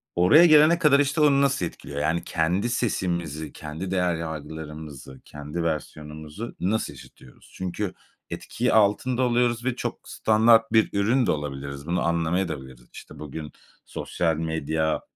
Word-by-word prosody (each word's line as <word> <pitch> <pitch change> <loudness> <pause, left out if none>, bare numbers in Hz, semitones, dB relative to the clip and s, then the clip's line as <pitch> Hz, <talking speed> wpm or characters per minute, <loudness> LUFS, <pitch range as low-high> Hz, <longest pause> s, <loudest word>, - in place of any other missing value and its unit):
Oraya 95 - +6
gelene 155 +1 +6
kadar 145 -3 +5
işte 145 +2 +1
onu 140 -2 +5
nasıl 140 -9 +1
etkiliyor? 70 -3 -7
Yani 80 +3 0
kendi 90 +8 0
sesimizi, 85 - -2
kendi 80 +5 -6
değer 90 -2 +1
yargılarımızı, 75 -4 -8
kendi 75 +3 -6
versiyonumuzu 75 +4 -5
nasıl 110 +5 -1
işitiyoruz? 65 - -16
Çünkü 95 +2 -4 0.4
etkiyi 125 +2 -2
altında 110 +4 +2
oluyoruz 120 -1 +1
ve 130 -2 0
çok - - -5
standart 110 +1 +4
bir 110 - +4
ürün 120 +5 +2
de - - +3
olabiliriz, 70 0 -5
bunu 85 0 0
anlamayadabiliriz. 80 -7 -2
İşte - - -12
bugün 75 +1 -7 0.3
sosyal 80 -2 -2
medya, 80 0 -1
85 Hz, 135 wpm, -25 LUFS, 75-115 Hz, 0.4 s, Oraya